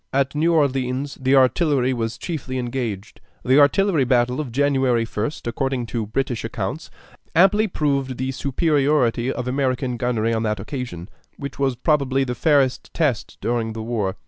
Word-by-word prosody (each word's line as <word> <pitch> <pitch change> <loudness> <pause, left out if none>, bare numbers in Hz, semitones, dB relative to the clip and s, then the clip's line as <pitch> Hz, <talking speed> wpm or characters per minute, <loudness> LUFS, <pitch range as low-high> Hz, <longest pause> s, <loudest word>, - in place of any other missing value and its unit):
At 135 0 +1
New 160 +3 +2
Orleans 135 -2 0
the 130 +1 +3
artillery 130 -1 +3
was 115 -2 -3
chiefly 135 -6 -4
engaged. 120 -5 -4 0.2
The 130 +3 +5
artillery 160 +2 +4
battle 125 +1 +2
of 135 -6 -6
January 130 -3 +2
1st, 115 +6 -4
according 130 +1 -2
to 115 -3 -2
British 120 +1 -2
accounts, 115 +6 -4 0.5
amply 200 +5 +5
proved 140 -7 -1
the 130 +1 -2
superiority 135 -3 +1
of 125 -1 -4
American 130 -1 -1
gunnery 115 -2 0
on 110 - 0
that 105 -2 -1
occasion, 100 - -6 0.3
which 140 0 -7
was 135 -2 +1
probably 135 0 +1
the 125 -2 -2
fairest 135 -3 +1
test 145 -8 -1
during 115 -2 -1
the 110 0 -5
war. 105 -5 -2
130 Hz, 155 wpm, -22 LUFS, 120-140 Hz, 0.5 s, The